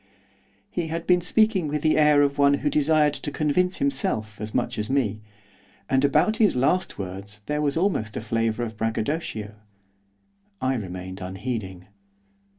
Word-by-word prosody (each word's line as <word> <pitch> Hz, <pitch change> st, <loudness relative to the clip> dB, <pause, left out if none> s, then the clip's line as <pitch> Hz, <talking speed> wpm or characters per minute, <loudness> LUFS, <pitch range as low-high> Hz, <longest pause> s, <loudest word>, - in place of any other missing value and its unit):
He 175 Hz, -2 st, -2 dB
had 165 Hz, +1 st, -4 dB
been 180 Hz, -1 st, +4 dB
speaking 195 Hz, -1 st, +2 dB
with 150 Hz, 0 st, -2 dB
the 155 Hz, -, +3 dB
air 150 Hz, -1 st, +5 dB
of 140 Hz, 0 st, 0 dB
one 140 Hz, 0 st, +5 dB
who 145 Hz, +1 st, -1 dB
desired 150 Hz, 0 st, +3 dB
to 145 Hz, -, -4 dB
convince 170 Hz, +6 st, +1 dB
himself 190 Hz, -, -1 dB
as 110 Hz, 0 st, -5 dB
much 120 Hz, 0 st, -1 dB
as 105 Hz, -, -3 dB
me, 115 Hz, -6 st, 0 dB, 0.7 s
and 135 Hz, 0 st, +3 dB
about 150 Hz, +10 st, +3 dB
his 215 Hz, -, +3 dB
last 150 Hz, +9 st, +1 dB
words 100 Hz, +2 st, -7 dB
there 150 Hz, 0 st, -1 dB
was 145 Hz, 0 st, 0 dB
almost 165 Hz, -, 0 dB
a -, -, -3 dB
flavour 115 Hz, 0 st, -1 dB
of 110 Hz, -2 st, -5 dB
braggadocio. 110 Hz, -1 st, -2 dB, 1.1 s
I 130 Hz, +1 st, +1 dB
remained 95 Hz, -4 st, -6 dB
unheeding. 95 Hz, -1 st, -5 dB
140 Hz, 155 wpm, -25 LUFS, 110-155 Hz, 1.1 s, air